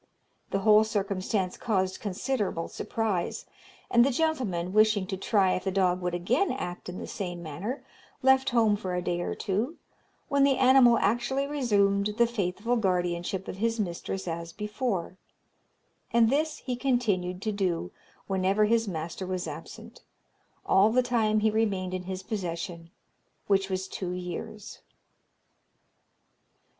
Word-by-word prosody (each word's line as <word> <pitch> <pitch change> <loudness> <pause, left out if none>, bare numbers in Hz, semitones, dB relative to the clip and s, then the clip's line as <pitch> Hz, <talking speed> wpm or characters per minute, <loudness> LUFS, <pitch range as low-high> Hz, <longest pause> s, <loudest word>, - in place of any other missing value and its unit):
The 195 - -1
whole 215 +1 +6
circumstance 195 -2 -1
caused 190 -5 0
considerable 205 -3 -2
surprise; 215 -6 -2 0.5
and 235 0 +6
the 270 - +3
gentleman, 245 - -1
wishing 215 -2 +4
to 190 0 -3
try 195 -1 +2
if - - -2
the 190 - -1
dog 185 -1 +2
would 180 0 -1
again 245 - +1
act 180 -9 -5
in 180 - -6
the - - -5
same 175 -3 -5
manner, 185 - -5 0.4
left 265 0 +5
home 225 -4 +3
for 185 -3 -4
a 180 - -1
day 175 -1 -1
or - - -3
two, 225 - -2 0.5
when 280 -2 +3
the 275 -2 +4
animal 255 -2 +6
actually 240 +7 +1
resumed 205 -7 +1
the 235 - +5
faithful 230 +1 -1
guardianship 180 -2 -1
of - - -6
his 230 +2 0
mistress 190 0 -3
as 170 0 -4
before; 210 -3 -3 0.9
and 230 -1 +4
this 310 +3 +1
he 250 - -4
continued 220 -9 0
to 215 - 0
do 180 - -1 0.3
whenever 195 +2 +2
his 225 +1 +2
master 170 +1 -4
was 185 -1 -3
absent, - - -9 0.6
all 195 +3 +5
the 250 +3 +3
time 220 -3 +2
he 220 0 +3
remained 200 -4 0
in 185 -1 -4
his 190 0 -5
possession, 170 -4 -4 0.6
which 195 -1 +2
was 190 0 -2
two 185 -1 -4
years. 180 +3 -6
200 Hz, 145 wpm, -28 LUFS, 185-230 Hz, 0.9 s, whole